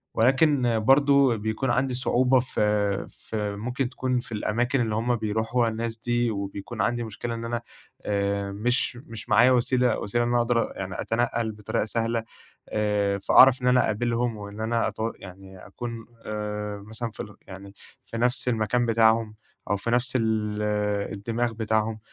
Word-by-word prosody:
ولكن 130 -1 +3
برضه 140 +1 +4
بيكون 110 +4 -1
عندي 130 +1 +1
صعوبة 130 +1 +3
في 105 -5 0
في، 105 -2 -4
ممكن 120 +4 -2
تكُون 130 -1 -1
في 120 -1 -10
الأماكن 120 +5 0
اللي 110 -2 -1
هُم 120 +2 +1
بيرُوحوها 110 +2 0
الناس 115 0 -4
دي، 120 0 0
وبيكون 100 +2 -5
عندي 120 +2 0
مشكلة 115 +2 -5
إن 115 0 -6
أنا 120 0 -2 0.4
آآ، 100 -1 -1
مش 120 +5 0
مش 115 -1 -8
معايا 125 +2 +6
وسيلة 125 -1 +2
وسيلة 120 +4 0
إن - - -1
أنا 120 - +2
أقدَر 120 0 +1
يعني 95 -2 -5
أتنقّل 115 -1 -1
بطريقة 105 0 -2
سهلة 115 +1 -1 0.5
آآ، 105 -2 0
فأعرَف 130 +5 +6
إن 125 - 0
أنا 125 0 +5
أقابلهم 115 +1 -1
وإن 100 +1 -8
أنا 115 0 0
أت 105 - -6 0.2
يعني 95 0 -12
أكُون 115 +3 -7 0.2
آآ، 105 -1 -4
مثلًا 110 +1 -5
في - - -16
ال 105 - -12
يعني 100 +1 -11 0.3
في 115 - -7
نَفْس 125 +2 +2
المكان 120 +1 +1
بتاعهم 115 -1 +3 0.3
أو 100 - +2
في 115 +4 -3
نَفْس 125 +1 +2
ال 110 -2 0 0.5
الدماغ 115 +4 -2
بتاعهم. 110 0 -1
115 Hz, 160 wpm, -25 LUFS, 105-120 Hz, 0.5 s, معايا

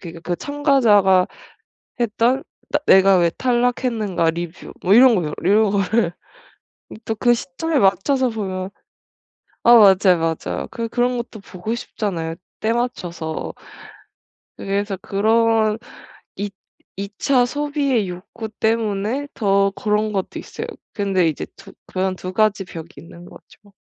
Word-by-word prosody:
그러니까 165 -2 -9
그 175 - +2
참가자가 230 - +3 0.7
했던 240 +3 +1 0.3
'나 295 - +2
내가 190 -1 +6
왜 170 -1 +3
탈락했는가 240 -6 0
리뷰.' 170 +1 -7
뭐 190 - +5
이런 245 +1 +7
거요. 155 -5 -2
이런 205 +2 +3
거를 195 -2 +1 0.8
이 - - -10
또 225 - -2
그 240 +3 +3
시점에 280 +5 -2
맞춰서 240 +7 +2
보면 190 -4 -4 0.9
아 240 - +8
맞아요, 195 -4 +6 0.3
맞아요. - - -3
그 230 -1 -3
그런 245 +1 0
것도 235 -2 -6
보고 200 +4 -5
싶잖아요 170 -8 -4 0.3
때맞춰서. 205 -9 -3 1.0
그래서 200 0 -2
그런 220 +2 +2 0.6
이 205 0 -3 0.5
이차 210 +6 +1
소비의 285 -6 -1
욕구 185 +5 -7
때문에 220 +4 -1
더 200 -3 +2
그런 210 +1 -1
것도 195 -2 -3
있어요. - - -7 0.3
근데 195 -4 +1
이제 155 - -4
두 195 0 -14
그런 185 0 -2
2 185 0 -6
가지 210 -1 +2
벽이 165 -2 -9
있는 170 +1 -13
거죠. 205 +2 -17
210 Hz, 260 characters per minute, -20 LUFS, 185-235 Hz, 1.0 s, 아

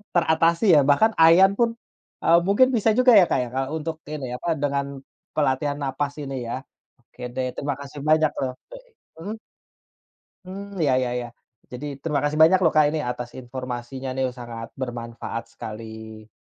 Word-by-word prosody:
teratasi, 165 +2 +3
ya. - - +7
Bahkan 220 +11 +5
ayan 170 +4 +7
pun, 235 -1 +4 0.5
eee, 170 +1 +6
mungkin 205 +6 +5
bisa 225 0 +2
juga 255 0 +5
ya, 180 - +6
Kak, - - +1
ya, - - -5
kayak 135 +1 -2
untuk 160 +1 -4
ini, 145 -5 -5
apa, 150 - -8 0.2
dengan 140 -1 0 0.5
pelatihan 145 0 +1
nafas 140 +1 -2
ini, 135 -1 -5
ya. 130 +3 -4 0.4
Oke - - -18
deh, 130 -1 -1
terima 145 -1 -2
kasih 140 +1 -9
banyak, 155 0 +4
loh 130 -1 -1 0.2
eee, - - -12 0.3
mhm? 210 +6 -6 1.1
Hmm, 195 +1 -8
iya 140 -4 +3
iya 125 - -1
iya, 120 - -4 0.5
jadi 125 +4 -6 0.2
terima 150 -4 0
kasih 145 +1 -1
banyak 185 +4 +6
loh, 165 - +5
Kak, 155 -1 +5
ini 155 - 0
atas 125 -1 -5
informasinya, 125 +1 -6
nih. 130 - 0
Sangat 115 -1 -7
bermanfaat 115 -2 -5
sekali. 110 0 -9
140 Hz, 170 wpm, -24 LUFS, 125-165 Hz, 1.1 s, ya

